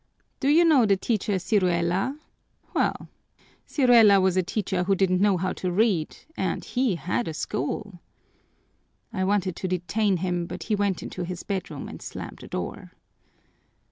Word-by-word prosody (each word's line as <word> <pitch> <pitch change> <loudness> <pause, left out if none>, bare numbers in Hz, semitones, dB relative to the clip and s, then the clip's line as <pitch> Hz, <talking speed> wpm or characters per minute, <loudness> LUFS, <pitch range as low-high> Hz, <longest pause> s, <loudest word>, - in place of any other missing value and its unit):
Do 270 - -1
you 330 +4 +6
know 280 -9 +5
the 195 -1 +3
teacher 210 +1 -1
Ciruela? 185 +5 +1 0.6
Well, - - 0 0.6
Ciruela 235 -7 +6
was 190 -1 +2
a 185 - +4
teacher 190 -1 -2
who 195 +1 +3
didn't 185 -1 +2
know 200 -2 +4
how 185 +1 -1
to 185 - -3
read, 190 -5 +1 0.2
and - - -2
he 250 -6 0
had 180 +8 -2
a 160 - -4
school.' 175 +8 -4 1.1
I 190 -3 -1
wanted 190 -2 +1
to 185 - -3
detain 185 +3 0
him, 175 -1 -2
but 175 0 -6
he 215 - 0
went 200 -3 -1
into 185 - -6
his 180 0 -5
bedroom 185 -7 -4
and - - -9
slammed - - -7
the - - -10
door. - - -6
190 Hz, 160 wpm, -25 LUFS, 180-210 Hz, 1.1 s, you